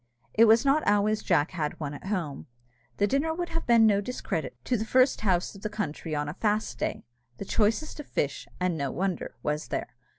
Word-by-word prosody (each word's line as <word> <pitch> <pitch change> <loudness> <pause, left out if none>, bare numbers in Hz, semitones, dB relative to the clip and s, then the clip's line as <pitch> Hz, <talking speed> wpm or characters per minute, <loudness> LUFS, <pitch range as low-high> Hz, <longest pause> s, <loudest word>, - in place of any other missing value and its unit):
It 225 - +6
was 225 +3 +5
not 280 +3 +4
always 210 +1 +3
Jack 165 -4 +2
had 155 -5 -3
one 145 -2 -4
at 145 - -9
home. 175 -9 -3 0.5
The 205 - +3
dinner 280 +9 0
would 350 0 -3
have 330 -2 -3
been 230 -2 +6
no 205 -2 +4
discredit 160 - -4
to 250 - +1
the 220 - -1
first 255 +4 +3
house 185 -4 +1
of 195 - -12
the 215 - -3
country 165 -6 -4
on 145 0 -1
a 145 - -4
fast 210 +3 -1
day. - - -3 0.3
The - - -6
choicest 225 +11 0
of 295 - -7
fish, 140 0 -2
and 180 -2 +1
no 140 -3 -2
wonder, 185 +3 -2
was 150 +1 -1
there. - - -4
205 Hz, 210 wpm, -28 LUFS, 160-230 Hz, 0.5 s, It